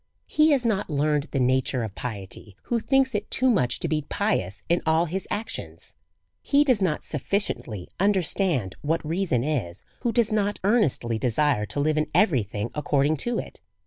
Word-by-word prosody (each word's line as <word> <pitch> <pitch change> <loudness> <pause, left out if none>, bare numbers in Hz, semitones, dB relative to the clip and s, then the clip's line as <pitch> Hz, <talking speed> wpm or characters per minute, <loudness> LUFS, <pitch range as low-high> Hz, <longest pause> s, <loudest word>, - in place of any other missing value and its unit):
He 305 +1 +3
has 275 -5 +3
not 205 -5 0
learned 150 0 +1
the 135 - -1
nature 130 0 +1
of 110 -3 -5
piety 100 -3 -6
who 235 - 0
thinks 265 +2 +2
it 210 0 -2
too 260 0 +2
much 125 - +1
to - - -1
be 155 -1 0
pious 140 - -2
in 170 +1 +2
all 160 +1 +3
his 185 +3 -4
actions. 215 +2 -5 0.5
He 285 +1 +4
does 255 -8 +2
not 165 -5 0
sufficiently 140 - -2
understand 180 - +1
what 160 +2 -1
reason 165 -8 0
is^ 120 - -2 0.2
who 240 - 0
does 225 -1 +2
not 205 -1 +1
earnestly 150 - +2
desire 125 -2 +1
to 110 - -3
live 155 +1 +2
in 155 - -1
every 175 - +4
thing 105 +2 -4
ac 150 - -2
cording 145 +1 +2
to 240 - -1
it. - - -7
155 Hz, 180 wpm, -25 LUFS, 125-205 Hz, 0.5 s, He